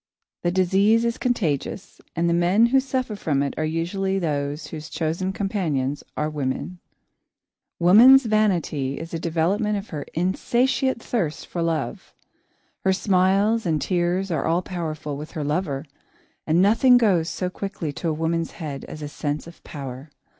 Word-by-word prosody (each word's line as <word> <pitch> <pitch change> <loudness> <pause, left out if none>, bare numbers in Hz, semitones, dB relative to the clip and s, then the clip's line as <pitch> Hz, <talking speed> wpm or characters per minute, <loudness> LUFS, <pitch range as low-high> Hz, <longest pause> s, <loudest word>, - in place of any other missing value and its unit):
The 175 - +1
disease 195 +5 +3
is 235 +1 -1
contagious, 195 - -2
and 170 +1 +1
the 170 - +2
men 175 +6 +4
who 270 - +7
suffer 260 -4 -2
from 145 -8 0
it 140 - -2
are 155 - -2
usually 175 +5 -1
those 150 -3 -2
whose 155 -1 -7
chosen 170 +4 -2
companions 160 -10 -2
are 150 - 0
women. 150 +4 -3 1.0
Woman's 235 +10 +7
vanity 175 -11 0
is 165 +1 -8
a 165 - -2
development 180 +6 0
of 200 +2 -7
her 150 -2 -6
insatiate 240 - +1
thirst 175 -11 -2
for 175 - -4
love. 165 -3 -3 0.7
Her 190 - +3
smiles 195 +3 +2
and 155 -2 +1
tears 180 +3 0
are 160 - -1
all 170 +2 +1
powerful 155 -5 -4
with 150 +2 -8
her 155 -4 -3
lover, 150 -1 -2 0.6
and 165 +3 +4
nothing 240 +5 +6
goes 185 -8 +2
so 180 -1 -3
quickly 190 -7 -5
to 165 - -3
a - - 0
woman's 165 +1 -1
head 145 -4 -6
as 155 - -8
a - - -3
sense 145 0 -3
of 170 0 -14
power. 135 0 -8
175 Hz, 160 wpm, -23 LUFS, 155-200 Hz, 1.0 s, who